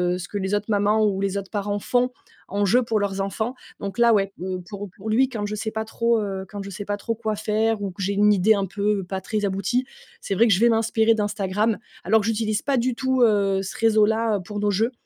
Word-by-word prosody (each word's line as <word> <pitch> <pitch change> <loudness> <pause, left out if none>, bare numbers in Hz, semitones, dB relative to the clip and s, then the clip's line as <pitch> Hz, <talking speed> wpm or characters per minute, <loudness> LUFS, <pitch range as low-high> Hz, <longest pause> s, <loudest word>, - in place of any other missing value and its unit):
heu, - - -3
ce 180 - -6
que 205 - -5
les 190 +1 0
autres 205 0 -1
mamans 210 +1 +3
ou 195 -2 0
les 200 0 -1
autres 195 -1 -6
parents 205 -1 -2
font 250 +4 +1 0.4
en 200 +1 0
jeu 245 +6 +4
pour 225 -2 0
leurs 195 -1 -1
enfants, 220 +5 -2 0.3
donc 200 +1 -5
là, 235 -1 +5
ouais, 195 -1 +1
heu, 185 0 -3
pour 205 -1 -6
pour 215 +3 -6
lui, 255 +4 +3
quand 215 -5 -4
je 210 - -3
sais 220 +1 -3
pas 220 0 -3
trop, 230 +1 +1
heu 195 -2 -4
quand 205 -1 -6
je 200 - -8
sais 200 +2 -6
pas 205 0 -2
trop 230 +2 -3
quoi 220 -1 -2
faire 215 0 0
ou 195 -2 -3
que 180 - -9
j'ai 195 +2 0
une 210 +1 +4
idée 205 +3 +4
un 200 -1 0
peu 200 +1 -1
pas 190 +1 -5
très 210 +2 -2
aboutie, 200 +7 0 0.4
c'est 195 - -2
vrai 230 +5 +5
que 215 - +5
je 185 - +2
vais 235 - +5
m'inspirer 225 0 +3
d'Instagram, 210 0 0 0.3
alors 220 +5 +3
que - - -5
j'utilise 215 -1 0
pas 275 -2 +1
du 245 0 0
tout, 260 0 0
heu, 200 -4 +3
ce 190 - -6
réseau-là 220 -1 +3
pour 205 +2 -6
nos 205 0 +1
jeux, 225 +5 +1
210 Hz, 260 wpm, -23 LUFS, 200-225 Hz, 0.4 s, là